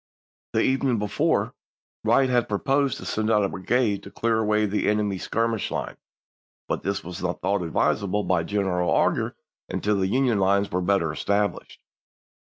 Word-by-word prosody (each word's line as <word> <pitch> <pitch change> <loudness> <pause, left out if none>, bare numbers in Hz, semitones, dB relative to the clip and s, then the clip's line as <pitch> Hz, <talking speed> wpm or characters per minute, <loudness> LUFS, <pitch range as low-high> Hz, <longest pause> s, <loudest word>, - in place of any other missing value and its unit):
The - - +2
evening 130 -2 +1
before, 105 -1 0 0.5
Wright 135 - +4
had 125 -2 +1
proposed 135 +5 +1
to - - -9
send 110 0 -1
out 105 -2 +3
a 100 - 0
brigade 105 +2 0
to - - -11
clear 115 -1 0
away 105 0 +2
the 105 0 0
enemy's 105 -3 0
skirmish 115 -1 -1
line, - - -4 0.7
but - - -2
this 100 0 -2
was 90 0 -7
not 90 -1 -2
thought 100 -1 0
advisable 100 +4 0
by 90 -3 +1
General 90 -1 0
Augur - - +1 0.3
until 105 0 0
the 95 -1 +1
Union 125 0 +2
lines 100 +1 +2
were 90 - 0
better 90 -4 +1
established. 100 +5 -2
105 Hz, 165 wpm, -25 LUFS, 95-115 Hz, 0.7 s, Wright